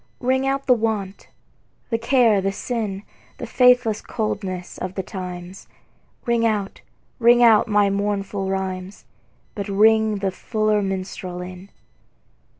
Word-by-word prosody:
Ring 260 +1 +1
out 275 0 -1
the 255 - +5
want, 215 -4 -3 0.6
the 230 - 0
care 230 -4 +3
the 195 +1 0
sin, 205 -2 -4 0.3
The - - -6
faithless 250 -4 +3
coldness 190 -5 -4
of 185 +1 -5
the 190 - -3
times; 180 0 -8 0.6
Ring 235 -2 +1
out, 210 -3 -1 0.4
ring 240 +1 +5
out 225 -3 +6
my 205 -2 +3
mournful 200 -1 -2
rhymes, 190 0 -4 0.5
But 200 -1 -5
ring 220 +2 +4
the 195 -1 -2
fuller 215 +1 0
minstrel 185 -2 -4
in. 185 +2 -10
205 Hz, 130 wpm, -22 LUFS, 190-230 Hz, 0.6 s, out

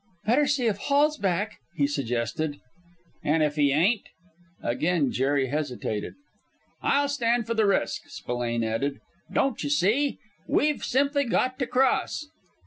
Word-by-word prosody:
"Better 270 +6 +3
see 270 -3 +1
if 215 -3 +1
Hall's 290 +6 +2
back," 195 +2 -1 0.2
he 145 - +2
suggested. 140 +2 -2 0.7
"And 155 +1 +2
if 150 -1 +1
he 145 -2 +3
ain't?" 190 +10 +3 0.6
Again 155 +3 +1
Jerry 135 0 +1
hesitated. 125 -7 -3 0.7
"I'll 285 0 +2
stand 240 -4 +1
for 230 - -1
the 220 -2 +2
risk," 200 - +1
Spillane 120 -1 -2
added. 125 +6 -1 0.3
"Don't 270 -9 0
you 145 - -2
see, 210 - +2
kid, - - -24 0.3
we've 300 0 +1
simply 280 +2 +2
got 255 +2 0
to 260 - 0
cross!" 260 +4 +1
190 Hz, 140 wpm, -26 LUFS, -, 0.7 s, Better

